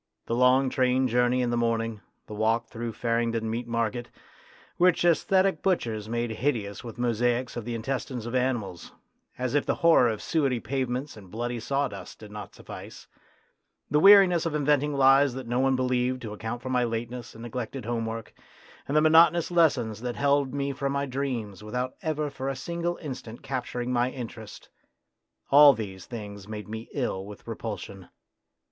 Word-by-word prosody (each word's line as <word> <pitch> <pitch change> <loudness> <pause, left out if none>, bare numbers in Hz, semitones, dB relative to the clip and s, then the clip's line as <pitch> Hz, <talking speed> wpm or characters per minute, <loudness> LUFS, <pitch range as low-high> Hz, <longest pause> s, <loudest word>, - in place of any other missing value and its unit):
The - - -3
long 125 +2 +4
train 130 0 +2
journey 125 +1 +2
in 120 - 0
the 120 - 0
morning, 115 -2 -1 0.2
the - - -9
walk 110 +2 +1
through 115 -1 -5
Farringdon 115 0 -1
Meat 115 +2 -3
Market, 115 0 -2 0.7
which 180 -1 +4
sesthetic 190 +3 +3
butchers 115 - -1
made 120 0 -1
hideous 110 -4 -2
with 115 -3 -8
mosaics 120 +1 0
of 120 -3 -5
the 120 -1 -3
intestines 125 0 -3
of 120 - -5
animals, 120 -9 -2 0.4
as 125 0 -2
if 145 - +3
the - - 0
horror 160 -7 +6
of 110 -2 -3
suety 135 -6 0
pavements 130 +2 -3
and 100 -4 -13
bloody 120 +3 -3
sawdust 140 +4 -3
did 105 -1 -12
not 105 0 -8
suffice, - - -10 0.9
the 150 - +4
weariness 190 -3 +7
of 155 - -2
inventing 145 0 +2
lies 135 -1 +5
that 130 -1 -6
no 120 +2 -1
one 135 0 +3
believed 125 0 0
to 105 -2 -5
account 110 +3 -5
for 130 - -4
my 125 -1 +2
lateness 120 +1 -4
and 115 - -10
neglected 120 +1 -5
homework, 115 -1 -3 0.5
and 145 - +1
the - - +6
monotonous 165 +2 +5
lessons 125 - +2
that 120 -1 -3
held 140 -1 +2
me 140 0 -2
from 140 +1 -2
my 140 0 0
dreams 125 -7 -4
without 125 +4 -3
ever 150 -2 -2
for 135 0 -4
a 135 - -2
single 170 +5 -3
instant 125 -5 -7
capturing 125 -2 -3
my 120 +1 +2
interest 115 -4 -8 0.8
all 145 0 +9
these 100 -5 -7
things 105 -4 -8
made 105 -1 -6
me 110 +1 -7
ill 120 -9 -2
with 105 +2 -11
repulsion. 105 -4 -6
125 Hz, 170 wpm, -27 LUFS, 115-135 Hz, 0.9 s, all